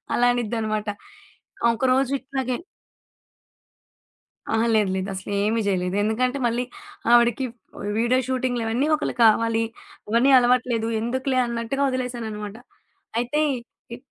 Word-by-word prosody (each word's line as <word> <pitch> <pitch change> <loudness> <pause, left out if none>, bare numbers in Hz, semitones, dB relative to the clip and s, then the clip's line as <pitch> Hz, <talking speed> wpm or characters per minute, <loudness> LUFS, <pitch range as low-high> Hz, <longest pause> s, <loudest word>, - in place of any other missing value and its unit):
అలా 245 - +4
అనిద్దనమాట. 220 -2 -2 0.9
ఒకరోజు 260 +2 +2
ఇట్లాగే 265 -2 -3 1.9
అహా! 225 +1 +2
లేదు, 210 -3 +3
లేదు. 190 0 -2
అసలేమీ 205 +4 -1
చేయలేదు. 180 -1 0
ఎందుకంటే 250 +5 0
మళ్ళీ 240 +1 +1 0.5
ఆవిడకి 240 +1 +4 0.4
వ్ - - -6
వీడియో 240 +3 +3
షూటింగ్లవన్నీ 250 0 0
ఒకళ్ళు 305 - -3
కావాలి. 225 +1 +3 0.5
అవన్నీ 235 +5 +4
అలవాట్లేదు. 245 -2 +2
ఎందుకులే 260 +3 -1
అన్నట్టుగా 235 +3 -2
వదిలేశాననమాట. 230 -5 -4 0.6
అయితే 245 +5 -1 0.6
ఇ - - -11
235 Hz, 100 wpm, -24 LUFS, 220-255 Hz, 1.9 s, అలా